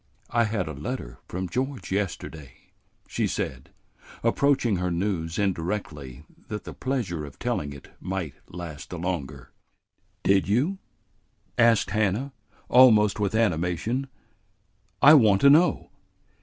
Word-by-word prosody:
"I 115 -1 +3
had 105 -5 -2
a 80 - -5
letter 70 - -6
from 90 +1 -4
George 130 +7 -3
yesterday," 85 -7 -4 0.5
she - - -1
said, 65 -1 -4 0.5
approaching 120 -3 +2
her 90 +1 -1
news 85 -2 -2
indirectly 80 -8 -3 0.2
that 105 -1 -5
the - - -8
pleasure 115 - -2
of 70 -3 -10
telling 70 - -2
it 70 -1 -12
might 90 -6 -4 0.2
last 85 -4 -8
the 90 - -6
longer. 70 -7 -4 0.7
"Did 95 0 +3
you?" 145 - +1 0.8
asked 115 -2 +4
Hannah, 110 +6 0 0.3
almost 110 -5 +6
with 100 0 0
animation. 105 +5 0 1.0
"I 145 +3 +10
want 110 -9 +6
to 140 - +7
know." 165 +4 +3
95 Hz, 125 wpm, -26 LUFS, 80-115 Hz, 1.0 s, I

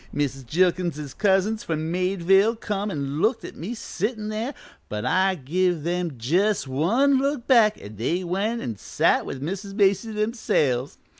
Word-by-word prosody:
Mrs. 135 -3 -2
Jilkins's 170 -3 0
cousins 205 - +1
from 160 0 -2
Meadville 190 +4 +3
come 210 -2 -3
an' 145 -3 -3
looked 225 +2 +1
at - - -9
me 205 +9 -5
sittin' 215 0 -3
there, 225 +6 -3 0.3
but 105 0 -4
I 190 +1 +2
give 175 +2 0
them 175 -2 -2
jus' 180 - +1
one 230 - +2
look 275 -2 -1
back 225 -5 +4
an' 105 0 -10
they 170 - -1
went 200 +7 -1
an' 115 -3 -4
sat - - +1
with 135 0 -5
Mrs. 195 +4 -5
Macy 200 +2 +2
themselves. 210 - 0
185 Hz, 155 wpm, -24 LUFS, 155-215 Hz, 0.3 s, back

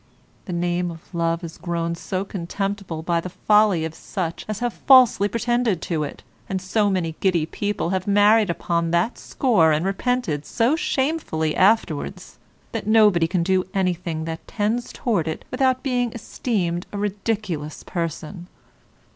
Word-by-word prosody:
The 185 - -6
name 175 0 0
of 165 +2 -12
love 170 0 0
is 165 -1 -8
grown 170 -1 -2
so 185 +3 -3
contemptible 195 -2 -4
by 170 0 +1
the 185 - -6
folly 200 -2 +3
of 160 - -5
such 170 -1 -4
as 215 -2 -3
have 240 +1 -2
falsely 255 -6 +5
pretended 235 -2 0
to 160 -3 -1
it, 145 - -7 0.3
and 190 - -1
so 205 +3 +1
many 175 -4 -1
giddy 175 -5 +2
people 205 0 -2
have 190 0 -1
married 205 +1 +5
upon 170 0 -1
that 170 +8 0
score 210 - +2
and 155 +3 +1
repented 195 - -1
so 235 - +1
shamefully 270 - -1
afterwards, 190 -6 +1 0.3
that - - -4
nobody 210 -6 +5
can 175 0 0
do 185 +1 +2
anything 175 -4 -1
that 165 0 -6
tends 225 +3 -1
towards 185 -10 -1
it 160 - -5
without 260 0 +1
being 245 -3 0
esteemed 195 -6 -2
a 205 - -5
ridiculous 200 -6 -3
person. 170 +1 -5
185 Hz, 155 wpm, -23 LUFS, 170-215 Hz, 0.3 s, falsely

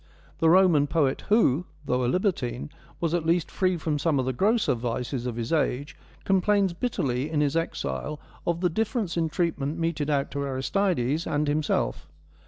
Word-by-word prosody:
The 165 - +4
Roman 170 -5 +5
poet 145 -3 0
who, 180 - +3 0.2
though 125 -1 0
a - - +1
libertine, 165 - -1 0.3
was 165 -1 -1
at 175 -2 +1
least 165 0 +1
free 185 -2 +1
from 155 -2 -1
some 155 -1 +1
of 130 - 0
the 130 - -1
grosser 215 - +2
vices 120 +1 -3
of 120 - -3
his 115 +4 -3
age, 145 -2 0 0.3
complains 195 0 +2
bitterly 145 - -1
in 155 -2 0
his 145 0 +1
exile 165 -2 -2 0.3
of 170 0 0
the 180 - +3
difference 220 -1 -1
in 165 -2 0
treatment 155 -3 -1
meted 165 -3 -1
out 140 -2 0
to 140 - -3
Aristides 140 +1 0
and 150 0 0
himself. 145 - 0
155 Hz, 175 wpm, -26 LUFS, 135-175 Hz, 0.3 s, Roman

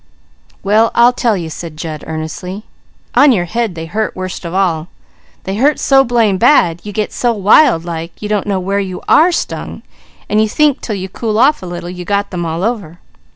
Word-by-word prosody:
"Well 215 +3 +3
I'll 240 +1 +5
tell 235 -4 +1
you," 165 -3 -5
said 160 -1 -8
Jud 155 -2 -6
earnestly. 160 +5 -6 0.5
"On 285 -1 +6
your 185 -7 +1
head 225 0 -2
they 160 0 -6
hurt 215 +6 -3
worst 185 -1 -6
of 170 - -4
all. 175 -4 0 0.6
They 195 +1 -4
hurt 285 +6 +3
so 270 -1 +4
blame 230 -6 +1
bad, 180 - +4
you 210 - -6
get 210 +1 -3
so 240 - +1
wild 205 - +4
like 165 0 -6
you 210 - -5
don't 210 -2 -1
know 195 -2 0
where 195 +2 -1
you 185 -2 -5
are 340 +4 +5
stung, - - -4 0.4
and 210 +1 +2
you 220 - +1
think 295 +2 +2
till 215 - -3
you 190 -1 -5
cool 215 +3 -3
off 280 +6 +3
a 185 - -7
little, 175 0 -6
you 180 0 -7
got 200 +2 -1
them 175 -2 -3
all 165 +3 -3
over." 200 -8 -3
200 Hz, 205 wpm, -15 LUFS, 175-230 Hz, 0.6 s, On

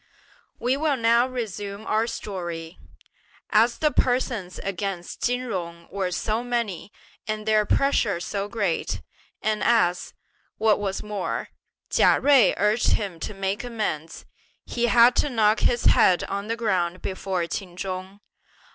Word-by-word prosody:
We 250 +2 +1
will 295 -2 +1
now 235 +1 +4
resume 210 -4 -5
our 220 +2 +1
story. 175 -7 -6 0.7
As 230 +2 +4
the 305 -1 +2
persons 245 -9 0
against 195 -2 -4
Chin 245 +1 +1
Jung 170 -8 -5
were 195 -2 -1
so 215 +5 -1
many 235 -6 -3 0.4
and 215 0 -3
their 215 -1 +3
pressure 230 -9 +2
so 200 +3 -3
great, 205 -6 -2 0.4
and 215 -1 0
as, 180 -7 +2 0.4
what 215 -1 +3
was 195 -1 -3
more, 210 -3 -3 0.4
Chia - - +4
Jui 270 -9 +5
urged 210 +4 +2
him 195 -6 -2
to 210 - -5
make 195 +2 -2
amends, 215 -10 -4 0.4
he 240 0 -1
had 240 +1 +6
to 295 - +2
knock 220 -3 +3
his 240 - +1
head 180 -1 +5
on 200 +1 -4
the 230 +1 -2
ground 185 -6 -1
before 190 -2 -2
Ch'in 180 0 -6
Chung. 190 +1 -5
210 Hz, 140 wpm, -25 LUFS, 185-235 Hz, 0.7 s, had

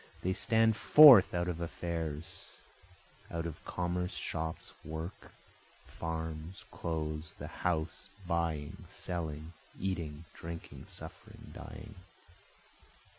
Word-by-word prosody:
They 95 - +1
stand 110 +2 +4
forth 135 -9 +10
out 85 0 0
of 85 -1 -3
affairs, 80 -2 -4 0.8
out 85 0 -3
of 80 -2 -6
commerce, 90 +1 -2
shops, 80 0 -4
work, 80 +4 -6 0.5
farms, 80 +1 -5
clothes, 75 -1 -3
the - - -7 0.2
house, 85 -2 -1 0.2
buying, 80 -4 -2
selling, 80 -2 -4 0.3
eating, 85 -5 -3
drinking, 85 0 -8
suffering, - - -9
dying. 110 - -9
85 Hz, 95 wpm, -33 LUFS, 80-90 Hz, 0.8 s, forth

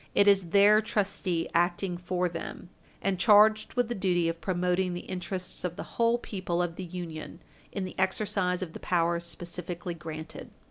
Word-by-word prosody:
It 200 - +5
is 195 -3 +5
their 205 +3 +6
trustee 195 -5 -1
acting 175 +2 +1
for 180 +1 -1
them, 175 +1 -7 0.3
and 195 -2 0
charged 215 +1 +5
with 245 -2 +2
the 240 - -2
duty 180 -5 +1
of 165 0 -5
promoting 180 0 0
the 175 - -4
interests 185 0 -4
of 175 -1 -2
the - - -5 0.2
whole 230 +1 +4
people 185 -6 -3
of 175 -2 -1
the 185 - -6
Union 170 -2 -7 0.3
in 195 -2 -3
the 185 - -7
exercise 190 -1 +1
of 165 -3 -7
the - - -7
powers 170 -1 +1
specifically 175 0 -4
granted. 160 -1 -7
180 Hz, 175 wpm, -29 LUFS, 175-195 Hz, 0.3 s, their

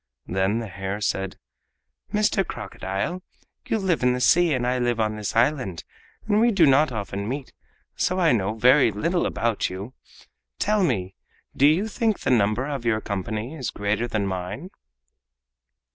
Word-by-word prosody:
Then 95 +3 0
the 115 -1 -3
hare 95 +2 -4
said: 95 -2 -2 0.7
"Mr. 210 -1 +2
Crocodile, 120 - -4 0.5
you - - +1
live 190 -5 0
in 125 0 +3
the 125 - -2
sea 165 +7 +4
and 125 -2 0
I 125 +1 +1
live 120 -1 0
on 110 -1 0
this 105 -1 -4
island, 120 - +1 0.4
and 210 -1 +2
we 240 - +5
do 195 -7 +4
not 140 +1 +4
often 100 -2 -4
meet, 135 +1 -5 0.4
so 185 - 0
I 170 -3 +4
know 105 -2 0
very 125 +4 +5
little 170 - 0
about 115 -2 -1
you. 100 +7 -7 0.6
Tell 210 -1 +1
me, 95 - 0 0.4
do 140 - +5
you 175 +8 +3
think 220 -1 -1
the - - 0
number 110 +1 +2
of 140 -4 -4
your 115 -2 +1
company 110 - -4
is 130 -8 -4
greater 105 +4 -1
than 110 -3 -1
mine?" 95 - -5
120 Hz, 165 wpm, -24 LUFS, 100-155 Hz, 0.7 s, we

